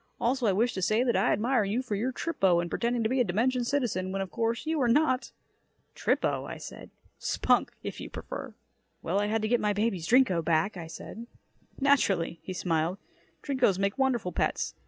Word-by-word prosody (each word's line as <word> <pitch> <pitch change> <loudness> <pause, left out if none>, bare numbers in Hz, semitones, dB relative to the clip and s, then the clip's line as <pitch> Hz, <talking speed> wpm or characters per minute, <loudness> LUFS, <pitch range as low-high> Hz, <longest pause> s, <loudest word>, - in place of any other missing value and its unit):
Also, 250 0 +1
I - - +4
wish 225 +6 +1
to 190 - -4
say 215 +6 +2
that 245 -2 +1
I - - +3
admire 235 +2 +2
you 215 +6 -1
for 250 - -4
your 225 +6 0
trippo 195 - +1
in 175 0 -3
pretending 235 0 0
to 220 - +1
be 260 +2 +1
a - - +5
dimension 240 +6 +1
citizen, 235 -8 -1
when, 195 - -2
of 195 -1 -4
course, 230 +2 -1
you 315 -2 0
are 245 - +3
not." 255 +1 +2 0.6
"Trippo?" - - 0 0.7
"Spunk, - - +1
if - - -6
you - - -7
prefer." - - -7 0.5
"Well, 200 - 0
I 205 - 0
had 220 +1 0
to - - +1
get 240 +1 +2
my 210 -1 +1
baby's 200 -5 -1
Drinko 235 -10 +4
back," 165 +6 +1
I 170 -3 -7
said. 225 +7 -9 0.5
"Naturally," 195 - +2
he - - -7
smiled. 170 0 0 0.5
"Drinkos 260 -9 +2
make 200 +5 -1
wonderful 245 -8 +1
pets. - - -1
220 Hz, 195 wpm, -28 LUFS, 190-250 Hz, 0.7 s, a